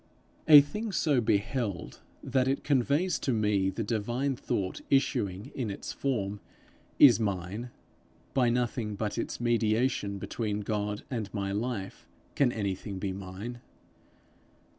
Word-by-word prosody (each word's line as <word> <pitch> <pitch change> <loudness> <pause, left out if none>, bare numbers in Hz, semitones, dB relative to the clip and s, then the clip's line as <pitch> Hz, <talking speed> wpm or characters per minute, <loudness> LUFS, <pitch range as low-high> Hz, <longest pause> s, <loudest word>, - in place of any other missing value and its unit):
A 150 -2 +11
thing 210 +10 -4
so 150 -8 +2
beheld 105 -3 -1 0.2
that 130 -1 +1
it 135 +1 0
conveys 145 +6 +2
to 135 - -1
me 105 -4 +2
the 100 +4 -3
divine 120 +6 -1
thought 95 -5 -3
issuing 105 -8 +1
in 125 -5 -3
its 100 - -5
form, 105 -7 -2 0.6
is 125 -7 +8
mine; 100 +3 -3 0.6
by 125 -3 +3
nothing 120 -3 -1
but 105 0 -2
its - - -3
mediation 115 -2 +1
between 105 +1 -3
God 105 0 -2
and 110 -5 -3
my 100 -1 -2
life, 105 -1 -4 0.3
can 135 -4 +3
anything 100 -2 -3
be 95 0 -3
mine. 100 +5 -7
110 Hz, 130 wpm, -29 LUFS, 100-130 Hz, 0.6 s, A